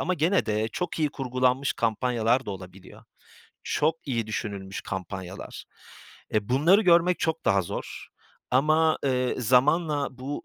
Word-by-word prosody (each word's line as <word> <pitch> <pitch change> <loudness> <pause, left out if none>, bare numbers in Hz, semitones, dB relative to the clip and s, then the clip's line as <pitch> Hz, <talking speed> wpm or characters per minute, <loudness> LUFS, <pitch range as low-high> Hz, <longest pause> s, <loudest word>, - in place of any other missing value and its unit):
ama 185 - 0
gene 170 +4 +1
de 110 0 0
çok 175 +10 -4
iyi 155 -2 +2
kurgulanmış 130 0 0
kampanyalar 120 +2 0
da - - -3
olabiliyor. 95 -1 -11 0.6
Çok 155 +2 0
iyi 115 -4 -1
düşünülmüş 100 -3 -5
kampanyalar. 95 0 -7 0.7
E, 105 -2 0
bunları 160 - +4
görmek 175 -1 +4
çok 160 0 -2
daha 100 -1 +3
zor 85 - -7 0.4
ama, 155 +4 +3
eee, 125 -2 +1
zamanla 145 +5 +2
bu 140 +3 -5
130 Hz, 130 wpm, -26 LUFS, 105-155 Hz, 0.7 s, bunları